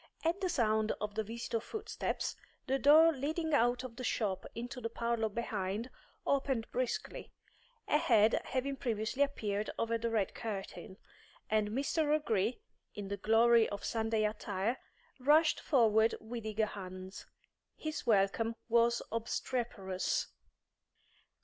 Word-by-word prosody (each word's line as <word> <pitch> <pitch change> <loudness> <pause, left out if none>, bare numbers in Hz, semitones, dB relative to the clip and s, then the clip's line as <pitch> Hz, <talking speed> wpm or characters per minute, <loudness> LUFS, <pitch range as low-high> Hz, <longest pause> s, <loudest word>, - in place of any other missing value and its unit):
At 335 +4 0
the 370 - 0
sound 220 -8 +2
of 210 -1 -3
the 220 +1 -1
visitors' 230 +1 -3
footsteps, 440 - -3 0.3
the 270 +1 0
door 315 +4 +7
leading 315 +3 -2
out 245 -2 +3
of 245 -2 -8
the 255 - -5
shop 195 -6 -1
into 245 +2 -5
the 230 - -2
parlour 235 -1 -1
behind 215 +1 -3 0.3
opened 270 -4 +1
briskly, 255 0 -3 0.6
a 300 - +3
head 225 -5 +4
having 270 +1 -2
previously 230 +2 -2
appeared 215 -7 0
over 230 0 0
the 230 +1 -1
red 220 -4 0
curtain, 195 -2 -6 0.5
and 215 -1 +2
Mr. 285 +6 0
O'Gree, 225 - 0 0.4
in 205 -2 -6
the 200 - -3
glory 225 +2 +4
of 205 - -5
Sunday 225 -1 0
attire, 210 +2 -2 0.4
rushed 305 +5 +4
forward 225 -5 +3
with 225 0 -6
eager 215 0 +1
hands. 185 -2 -8 0.5
His 310 0 -4
welcome 225 +2 +2
was 235 0 +3
obstreperous. 225 -4 -2
230 Hz, 130 wpm, -33 LUFS, 215-260 Hz, 0.6 s, door